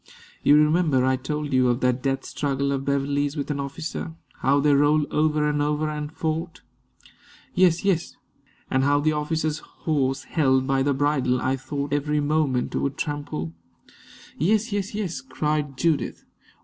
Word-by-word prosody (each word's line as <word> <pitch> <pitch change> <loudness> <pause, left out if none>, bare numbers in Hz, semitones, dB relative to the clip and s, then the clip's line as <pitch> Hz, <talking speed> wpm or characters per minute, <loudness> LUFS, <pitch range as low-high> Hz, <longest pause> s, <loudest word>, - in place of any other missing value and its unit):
You 145 - +5
remember 150 -3 +3
I 130 0 +3
told 145 +2 -4
you 130 -1 +4
of 120 +1 +1
that 125 0 +1
death 135 0 -1
struggle 140 -1 -1
of 135 0 -2
Beverley's 140 +1 0
with 145 +1 -2
an 140 - -2
officer 155 +3 -5 0.2
how 140 +2 +3
they 145 0 +4
rolled 145 +1 +4
over 150 -1 +2
and 145 0 0
over 150 +1 0
and 150 0 -5
fought." 160 +1 -3 0.9
"Yes 180 0 +3
yes 180 -4 0 0.3
" - - -34
"And 130 0 +2
how 145 +1 +3
the 155 +2 +2
officer's 155 0 -1
horse, 135 -4 -2
held 130 -4 +2
by 135 0 +1
the 140 0 +1
bridle, 135 -3 +1
I 130 +1 0
thought 140 +2 -4
every 150 +1 +1
moment 145 -4 0
would 140 0 -1
trample 145 - -4 0.4
" - - -21
"Yes 215 - +2
yes 205 0 -2
yes!" 200 -2 -3
cried 150 - -2
Judith. 155 -5 0
145 Hz, 165 wpm, -24 LUFS, 135-155 Hz, 0.9 s, You